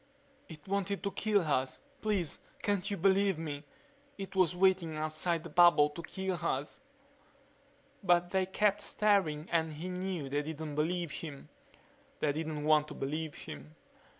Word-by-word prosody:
"It 155 -1 -11
wanted 200 0 -1
to 200 - -1
kill 210 -1 +2
us. 135 -5 0 0.2
Please 200 -7 -1 0.2
can't 200 -1 0
you 200 - -2
believe 195 0 +3
me? 150 -3 -5 0.5
It 195 -1 -7
was 180 -2 +3
waiting 180 -4 +2
outside 155 +2 0
the 170 - -8
bubble 170 -3 +6
to 160 - -7
kill 190 +1 -3
us." 140 - -2 1.2
But 175 -2 +3
they 190 -1 +1
kept 205 +1 +2
staring 185 -7 +1
and 160 -2 +1
he 165 +5 -5
knew 180 -4 -3
they 145 +2 0
didn't 155 0 -5
believe 165 +2 -1
him. 150 -4 -7 0.7
They 150 - +2
didn't 155 0 -3
want 150 0 +4
to - - -8
believe 155 +3 -3
him... 75 +1 -9
170 Hz, 150 wpm, -32 LUFS, 150-190 Hz, 1.2 s, bubble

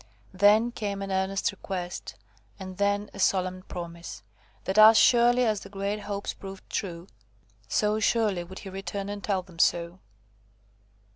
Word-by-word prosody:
Then 210 +5 +4
came 200 -4 -4
an 195 - -5
earnest 190 +1 0
request, 185 -2 -6 0.4
and 185 -1 -8
then 205 +1 0
a - - -10
solemn 185 -1 +1
promise, 170 -5 -8 0.4
that, 190 +3 +1
as 220 +1 +9
surely 245 +1 +5
as 215 -3 +1
the 195 - -11
great 200 +1 -3
hopes 200 -1 -4
proved 195 -1 -10
true, 175 -4 -4 0.6
so 210 - +1
surely 210 -5 +1
would 185 +2 -11
he 195 - -8
return 195 +1 -5
and 205 -1 -6
tell 190 -3 0
them 175 -3 -16
so. 170 +2 +1
195 Hz, 150 wpm, -27 LUFS, 185-210 Hz, 0.6 s, as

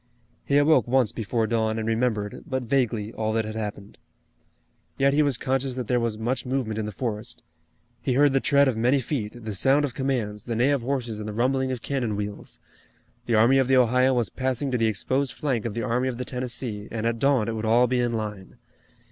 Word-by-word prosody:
He 140 - +2
awoke 145 -5 +4
once 125 -2 +2
before 115 0 -1
dawn 110 0 0
and 110 0 -3
remembered, 110 -3 -1
but 130 -1 -2
vaguely, 115 -4 0
all 110 0 -2
that 110 -1 0
had 110 - -5
happened. 105 -2 -6 1.0
Yet 140 0 +3
he 150 - +4
was 140 -5 +1
conscious 130 0 -1
that 125 -3 -4
there 125 +2 +2
was 115 -2 -2
much 120 +4 -2
movement 125 -4 -2
in 105 - -2
the - - -4
forest. 105 -1 -5 0.6
He 130 - 0
heard 140 +1 +4
the 135 - +4
tread 140 +1 +4
of 130 - +1
many 125 +5 +2
feet, 120 -3 -4
the 110 - -3
sound 135 +8 +3
of 135 - -5
commands, 115 -7 -2
the 115 - -3
neigh 125 +5 +3
of 140 -3 +1
horses 120 -4 -3
and 105 0 -5
the - - -5
rumbling 130 +3 +1
of 125 -3 -5
cannon 125 -7 -1
wheels. 105 0 -6 0.7
The 115 - +2
Army 120 +5 +5
of 130 - +2
the 135 0 +4
Ohio 125 +1 +4
was 120 -6 0
passing 130 +1 -2
to 125 - +1
the 115 - +3
exposed 130 +7 -1
flank 130 -7 -2
of 115 - -3
the 115 - -2
Army 125 +1 0
of 125 -2 -3
the 125 - -4
Tennessee 120 -4 -5
and 115 -1 -4
at 115 0 0
dawn 135 -5 +2
it 115 - -1
would 110 0 -4
all 120 +3 +5
be 125 0 0
in 120 -1 0
line. 105 -4 -5
120 Hz, 225 wpm, -25 LUFS, 110-130 Hz, 1.0 s, Army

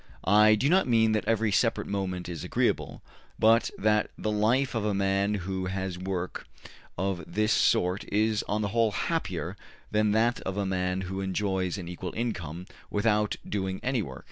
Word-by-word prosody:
I 105 +2 +6
do 125 +6 +1
not 185 +2 +4
mean 115 -2 +4
that 110 -1 0
every 115 -1 +1
separate - - +1
moment 95 -3 -3
is 85 -2 -5
agreeable, - - -1 0.3
but 115 +1 +4
that 105 0 +2
the 110 - -2
life 115 +6 +2
of 115 -3 -1
a 105 -1 0
man 100 +1 +1
who 95 -1 -3
has 95 -1 -3
work 90 -1 -4 0.5
of 95 -1 -1
this 110 +1 +2
sort 90 +2 +2
is 110 0 +2
on 105 +1 0
the 100 - -1
whole 115 0 +2
happier - - -2 0.4
than 105 0 +2
that 115 +3 +2
of 95 +1 -4
a 100 - 0
man 90 0 -1
who 95 +1 -4
enjoys 95 -1 -1
an 90 -3 -6
equal 90 +1 -6
income 90 -8 -4 0.2
without 105 0 +1
doing 95 -2 -2
any 130 -2 +1
work. 65 -9 -7
100 Hz, 175 wpm, -28 LUFS, 95-110 Hz, 0.5 s, I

